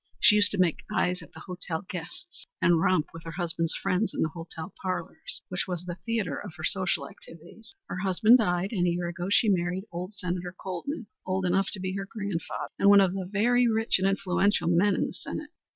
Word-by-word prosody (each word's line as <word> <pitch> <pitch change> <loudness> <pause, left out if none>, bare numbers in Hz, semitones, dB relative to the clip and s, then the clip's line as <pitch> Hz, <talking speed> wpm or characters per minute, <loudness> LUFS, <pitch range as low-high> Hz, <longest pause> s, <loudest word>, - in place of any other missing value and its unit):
She 210 - +7
used 210 -1 +6
to - - -1
make 180 -4 +2
eyes 180 0 +1
at - - -13
the - - -11
hotel 180 -1 -4
guests 180 - -7
and 170 -2 +4
romp 165 -4 +2
with 165 - -9
her 165 - -7
husband's 165 -2 0
friends 195 +3 0
in - - +1
the 160 - 0
hotel 165 +1 -7
parlors, 190 - -2
which - - -2
was 180 -1 -3
the 175 - -4
theatre 220 -10 -1
of 195 -5 -9
her 160 - -9
social 185 +3 +1
activities. - - -14 0.2
Her - - -5
husband 210 +6 +5
died, 180 -2 0
and 180 -6 +1
a - - +3
year 175 0 -1
ago 175 +1 -4
she 220 - +4
married 180 -1 +1
old 180 +4 -6
Senator 180 -1 -4
Colman, 195 - -4 0.2
old 185 0 -1
enough 190 +2 +2
to 195 - -3
be 185 0 -3
her 195 0 -4
grandfather, 200 -6 -4
and 200 - +5
one 200 0 +9
of 190 -2 +3
the 190 -2 -4
very 240 +4 +3
rich 225 -3 +2
and 190 - +2
influential 195 0 +1
men 180 +4 +4
in - - +1
the - - -5
Senate. 305 -1 -6
185 Hz, 215 wpm, -28 LUFS, 175-205 Hz, 0.2 s, one